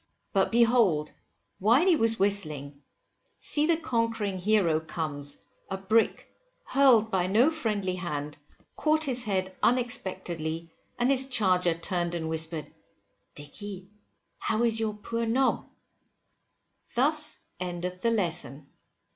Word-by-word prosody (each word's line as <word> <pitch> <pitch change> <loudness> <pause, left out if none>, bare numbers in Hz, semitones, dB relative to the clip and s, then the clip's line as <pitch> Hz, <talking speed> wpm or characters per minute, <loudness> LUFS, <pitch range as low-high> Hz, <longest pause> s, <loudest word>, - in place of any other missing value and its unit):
But 195 -2 +2
behold, 225 -10 +3 0.5
while 235 - +4
he 370 -3 +5
was 225 -5 +2
whistling, 155 -8 0 0.6
see 300 +1 +1
the 335 -1 +3
conquering 230 - -2
hero 180 -5 +2
comes, 150 -3 -2 0.3
a 195 - -3
brick, 215 +4 0 0.3
hurled 240 -6 +4
by 185 -1 +1
no 230 +11 +4
friendly 210 - -2
hand, 150 -5 -4 0.4
caught 310 0 +2
his 250 -4 0
head 190 -2 -2
unexpectedly, 170 -9 -1 0.3
and 245 +2 +2
his 265 0 +3
charger 185 -8 +2
turned 175 0 -1
and 160 -1 -3
whispered, 160 -1 -3 0.6
Dicky, 190 +6 -7 0.5
how 225 +1 0
is 225 -1 +2
your 215 -2 -2
poor 230 +2 -3
nob? 260 +4 +1 1.3
Thus 300 +4 +3 0.2
endeth 180 0 -5
the 230 - +2
Lesson. 170 - 0
200 Hz, 120 wpm, -27 LUFS, 170-235 Hz, 1.3 s, he